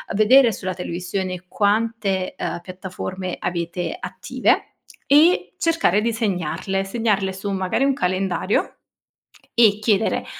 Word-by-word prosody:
vedere 235 +4 +6
sulla 185 -2 -4
televisione 180 +1 -4
quante, 205 -2 0
uhm, - - -3
piattaforme 185 0 -6
avete 170 0 -3
attive, - - -1 0.3
e 310 +6 +4
cercare 330 - +2
di 230 +2 0
segnarle, 195 -3 -2
segnarle 200 -1 0
su 190 +2 -5
magari 190 +6 0
un 275 0 +3
calendario 185 -4 -1 0.8
e 220 -4 +5
chiedere 215 -1 +1
195 Hz, 110 wpm, -22 LUFS, 185-225 Hz, 0.8 s, vedere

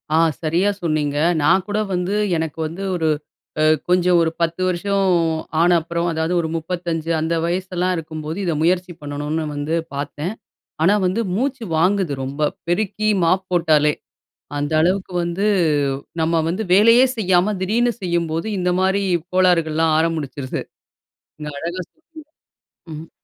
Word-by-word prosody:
ஆ, - - +4 0.3
சரியா 170 +6 +2
சொன்னீங்க. 155 -3 -1 0.2
நான் 185 +6 +4
கூட 205 +1 -1
வந்து 180 +2 -1 0.2
எனக்கு 160 -1 -4
வந்து, 170 +5 -7
ஒரு 160 -2 0 0.5
அ - - +4 0.3
கொஞ்சம் 180 0 +4
ஒரு 165 -1 +1
10 170 +2 0
வருஷம் 195 +2 0 0.5
ஆன 175 - +4
அப்புறம் 170 +1 -2
அதாவது 160 +2 -1
ஒரு 160 - -3
35 165 -1 -3
அந்த 160 +2 -1
வயசெல்லாம் 180 +1 -1
இருக்கும்போது 155 0 -5
இத 170 -3 0
முயற்சி 180 +2 +1
பண்ணணும்னு 145 +2 -3
வந்து 145 +3 -2 0.2
பார்த்தேன். 145 +6 -4 0.5
ஆனா 190 +5 +5
வந்து 185 +5 0
மூச்சு 260 +2 -1
வாங்குது, 185 -1 +2
ரொம்ப 140 +3 -5 0.3
பெருக்கி 215 +4 0
மாப் 185 +3 +2
போட்டாலே. 155 -3 +3 0.6
அந்த 145 +2 -2
அளவுக்கு 185 +2 0
வந்து 170 +4 -2 0.8
நம்ம 165 0 +2
வந்து 185 +6 -2
வேலையே 230 +6 +6
செய்யாம, 190 0 +2
திடீர்னு 235 +5 +1
செய்யும்போது 170 -1 -1
இந்த 180 0 +1
மாதிரி 190 +1 +2 0.3
கோளாறுகள்லாம் 165 -3 +3
ஆரம்பிக்கிறது 150 -5 -2 0.8
நீங்க 150 -1 -6
அழகா 175 +4 -4
சொன்னீங்க. 320 0 -15 0.7
ம்ஹ்ம். 155 +1 -8
170 Hz, 135 wpm, -20 LUFS, 160-190 Hz, 0.8 s, வேலையே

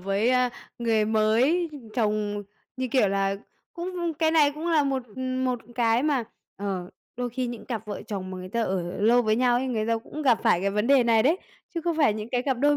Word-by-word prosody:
với 195 +6 +1 0.5
người 225 -2 +2
mới, 230 +11 +2 0.2
chồng 210 -3 0 0.3
như 260 0 -2
kiểu 250 -5 +3
là, 195 0 0 0.4
cũng 345 -2 -3
cái 320 -1 +3
này 300 -3 +4
cũng 310 +3 -5
là 320 -3 +4
một 270 -1 0 0.3
một 255 -1 0 0.2
cái 230 0 +2
mà, 285 -5 +1 0.3
ờ, 190 -2 -4 0.3
đôi 245 0 -2
khi 250 +2 -2
những 240 -1 -6
cặp 225 -3 -4
vợ 210 - -5
chồng 190 -3 -5
mà 185 - -6
người 185 0 -7
ta 235 +4 -1
ở 190 -4 -1 0.2
lâu 235 +4 +5
với 215 -1 +2
nhau 245 0 +3
ấy, 260 - -1
người 220 -4 -1
ta 230 0 +1
cũng 300 +6 -7
gặp 250 -5 +4
phải 220 -7 +3
cái 200 +1 0
vấn 210 +2 0
đề 275 -1 +5
này 225 -2 +4
đấy, 310 +9 +3 0.4
chứ 335 - -1
không 340 0 -1
phải 285 -9 +4
những 215 +1 -5
cái 245 -1 0
cặp 265 -3 -1
đôi 290 +2 +3
235 Hz, 225 wpm, -26 LUFS, 215-275 Hz, 0.5 s, lâu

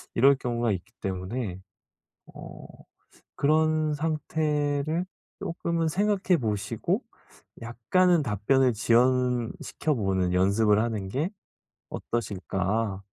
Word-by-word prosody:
이럴 135 +4 +6
경우가 120 -3 -1
있기 95 +3 -5
때문에 95 +1 -4 0.8
어 - - -10 0.8
그런 155 +1 +2
상태를 155 +1 -1 0.3
쪼끔은 170 -1 -2
생각해 195 -1 +2
보시고 105 -3 -1 0.6
약간은 155 +9 +2
답변을 125 +3 +2
지연시켜 125 +5 +1
보는 95 -5 0
연습을 100 +3 +3
하는 110 -4 -2
게 140 - -1 0.6
어떠실까. 100 -1 -2
120 Hz, 215 characters per minute, -27 LUFS, 105-155 Hz, 0.8 s, 이럴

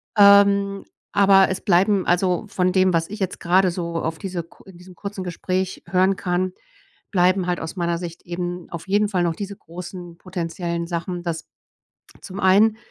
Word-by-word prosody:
ähm, 200 -1 +5 0.3
aber 195 -1 +5
es 190 - -3
bleiben 195 0 +3
also 180 +2 +1
von 185 -2 0
dem, 185 -1 +3
was 165 +1 0
ich 210 +1 -7
jetzt 190 -1 -3
grade 180 +1 +3
so 170 -1 -4
auf 160 0 -2
diese 185 -4 -4
ku 170 - -21
in 190 -3 -14
diesem 180 +1 -14
kurzen 200 +1 -6
Gespräch 185 +1 -3
hören 185 +2 +3
kann, 185 0 -1 0.6
bleiben 185 -1 +2
halt 180 - 0
aus 160 +2 -6
meiner 170 -2 -1
Sicht 170 -1 -7
eben 175 0 -5
auf 170 +1 -8
jeden 205 +2 +2
Fall 180 -3 0
noch 165 -2 0
diese 200 0 -6
großen 175 0 -9
potenziellen 170 -1 -4
Sachen, 175 +1 -4
dass 165 -1 -4 0.7
zum 190 -1 -8
einen 205 +3 +4
180 Hz, 175 wpm, -22 LUFS, 175-195 Hz, 0.7 s, ähm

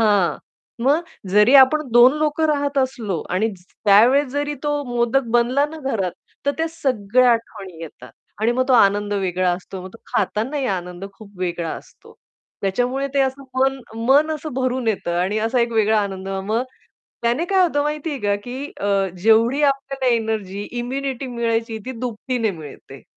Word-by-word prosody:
हां, 200 -8 +3 0.5
मग 290 +5 +4 0.3
जरी 210 +6 +5
आपण 275 +3 +7
2 240 +2 +7
लोकं 310 +1 +1
राहत 285 -2 0
असलो 230 - -1
आणि 190 +5 +1
ज 180 - -23 0.2
त्यावेळेस 235 +8 +5
जरी 290 +1 -2
तो 295 -1 -1
मोदक 240 +1 +1
बनला 250 +4 +2
ना, 315 +2 -9
घरात, 225 - -2 0.3
तर - - +4
त्या 325 - +1
सगळ्या 255 -6 +2
आठवणी 205 -6 -5
येतात. 125 -6 -11 0.3
आणि 225 +2 +2
मग 255 +1 +1
तो - - +4
आनंद 205 -2 +3
वेगळा 185 -2 0
असतो. 185 +1 -7
मग 185 - -8
तो 230 - -13
खातानाही 260 +6 -1
आनंद 180 -2 -4
खूप 205 0 -14
वेगळा 175 -2 -2
असतो. - - -13 0.5
त्याच्यामुळे 245 +7 0
ते 280 - +3
असं 270 +1 -1 0.2
मन 270 0 +2 0.3
मन 285 +5 +4
असं 310 0 -7
भरून 255 -2 -1
येतं 175 -5 -1
आणि 195 +4 0
असा 245 +2 +1
एक 235 0 0
वेगळा 220 -1 +3
आनंद 195 -1 -4
मग, 195 +4 -1 0.6
त्याने 240 +7 +1
काय 380 -1 +5
होतं 300 -5 +1
माहितीये 300 0 -3
का, 205 0 +1
की 255 +3 -5 0.2
अ, 200 -1 +1 0.2
जेवढी 230 +6 +4
आपल्याला 270 -2 -1
एनर्जी, 215 -3 -3 0.2
इम्युनिटी 265 +1 -3
मिळायची 230 -2 -2
ती 260 - -4
दुपटीने 245 -1 -2
मिळते. 145 -6 -11
235 Hz, 165 wpm, -21 LUFS, 200-270 Hz, 0.6 s, आपण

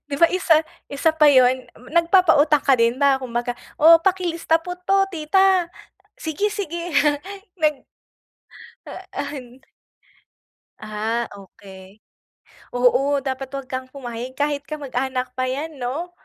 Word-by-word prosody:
'Di 285 - -4
ba 335 - +8
isa 345 -4 +3 0.3
isa 285 +3 +1
pa 315 -1 +4
'yun, 255 -1 +4
m 245 - -17
nagpapautang 335 -4 +4
ka 275 - +4
din 230 +2 +2
ba 275 -1 +3
kumbaga, 245 -1 -3 0.3
"O 330 +2 +8
pakilista 345 -3 +1
po 360 +2 -6
'to 390 +2 +2
tita," 365 +2 +2 0.5
"Sige-sige." 355 +1 -3 0.8
nag 305 -1 +3 1.1
ah, - - -9 0.3
an 250 -1 -11 1.2
Ah, 220 +2 -3
okey. 195 0 -15 0.8
Oo, 275 +3 +2
dapat 265 0 -4
'wag 275 -2 -6
kang 260 0 -5
pumayag 255 -1 -8
kahit 290 0 -1
kamag-anak 260 -3 -3
pa 255 - 0
yan 285 +3 -5
'no. 285 +9 -4
280 Hz, 120 wpm, -21 LUFS, 250-330 Hz, 1.2 s, ba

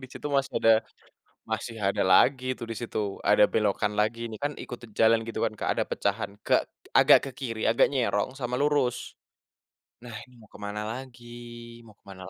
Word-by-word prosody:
disitu 130 +3 -8
masih 135 -1 -1
ada 115 - +4 0.8
masih 110 +1 -4
ada 100 - +1
lagi 130 +8 +4
tuh 115 - -6
disitu 115 -1 -4 0.2
ada - - +5
belokan 105 0 0
lagi 110 +2 0
nih 110 - -8
kan 145 - 0
ikut 125 - -8 0.2
jalan 115 0 +4
gitu 115 - -5
kan, - - -7
Kak, - - -2
ada - - +1
pecahan - - -2
ke - - 0 0.4
agak - - +7
ke 135 - -4
kiri, 115 -5 -4
agak 115 - +4
nyerong 130 -2 -1
sama 125 -2 -3
lurus. 145 -4 0 0.9
Nah, 120 -2 -9
ini 125 - -21
mau 110 - -17
kemana 105 0 -5
lagi 125 -1 -9 0.6
mau 105 - -17
kemana 95 -2 -12
115 Hz, 170 wpm, -27 LUFS, 110-130 Hz, 0.9 s, agak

